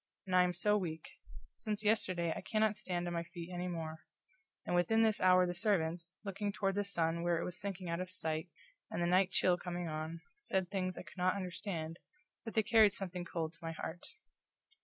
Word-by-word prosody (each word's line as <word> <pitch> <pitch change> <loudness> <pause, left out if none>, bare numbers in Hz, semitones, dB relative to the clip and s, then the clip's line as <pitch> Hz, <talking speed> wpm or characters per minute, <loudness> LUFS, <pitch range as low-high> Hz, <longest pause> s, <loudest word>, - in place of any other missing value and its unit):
And 185 -1 0
I 180 - +8
am 180 0 +2
so 210 +4 +3
weak; 160 -4 -4 0.5
since 215 -1 -3
yesterday 185 -6 +2
I - - -4
cannot 215 -1 +2
stand 180 -4 -2
on 175 - -2
my 170 - 0
feet 170 +1 -8
anymore. 170 -3 -3 0.7
And - - -1
within 220 +6 +4
this 220 -2 +2
hour 185 0 +6
the 175 - -1
servants, 175 -2 0
looking 200 +1 -2
toward 195 -1 0
the 205 +1 +1
sun 170 -4 0
where 170 -1 +2
it - - -2
was 180 0 -4
sinking 195 -2 -4
out 170 +1 -1
of 185 0 -3
sight 160 -1 -2 0.4
and - - -3
the 175 - +2
night 185 +2 +4
chill 180 -1 +3
coming 175 -1 -3
on, 160 +1 -4
said 190 - -1
things 185 -2 -1
I - - -5
could - - -15
not 185 +1 +3
understand, 180 -3 -4 0.4
but 225 - -7
they 220 - +4
carried 215 -2 +6
something 180 -3 -4
cold 165 -2 -3
to 165 - -22
my 165 0 -4
heart. 165 +2 -6
180 Hz, 205 wpm, -35 LUFS, 170-195 Hz, 0.7 s, I